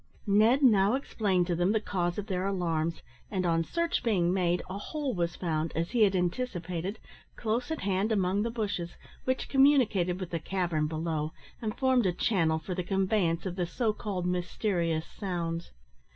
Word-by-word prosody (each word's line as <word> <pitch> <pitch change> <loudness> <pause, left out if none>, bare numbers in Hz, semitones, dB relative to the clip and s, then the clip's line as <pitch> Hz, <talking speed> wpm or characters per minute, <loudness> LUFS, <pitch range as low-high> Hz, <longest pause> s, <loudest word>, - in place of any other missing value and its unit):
Ned 220 +7 +4
now 210 -2 +5
explained 200 -9 0
to 175 -1 0
them 175 +4 +2
the 220 - +3
cause 175 -4 -2
of 205 - -3
their 185 -2 -1
alarms, 165 -4 -1 0.3
and 185 -3 -1
on 165 -1 +2
search 335 - -1
being 180 -6 +2
made, 180 -2 +1
a 190 +2 -5
hole 285 +4 -3
was 170 -2 -1
found, 160 -2 -1
as 165 +2 -1
he 240 -2 +1
had 200 -2 +5
anticipated, 180 -1 -2 0.4
close 235 +4 -1
at 320 - -3
hand 195 +2 0
among 195 -1 +2
the 230 - 0
bushes, 205 -7 -3 0.3
which 260 0 0
communicated 245 -11 +3
with 185 -3 -5
the 165 - -1
cavern 170 -3 -1
below, 155 -1 -2 0.3
and 215 -2 -3
formed 260 -5 +3
a 180 - +1
channel 165 -5 +2
for 160 +4 -5
the 180 - -1
conveyance 190 -2 +1
of 180 -2 -3
the 180 -2 -1
so 220 +5 0
called 195 -4 -3
mysterious 175 -2 0
sounds. 170 -4 -4
185 Hz, 180 wpm, -29 LUFS, 170-215 Hz, 0.4 s, now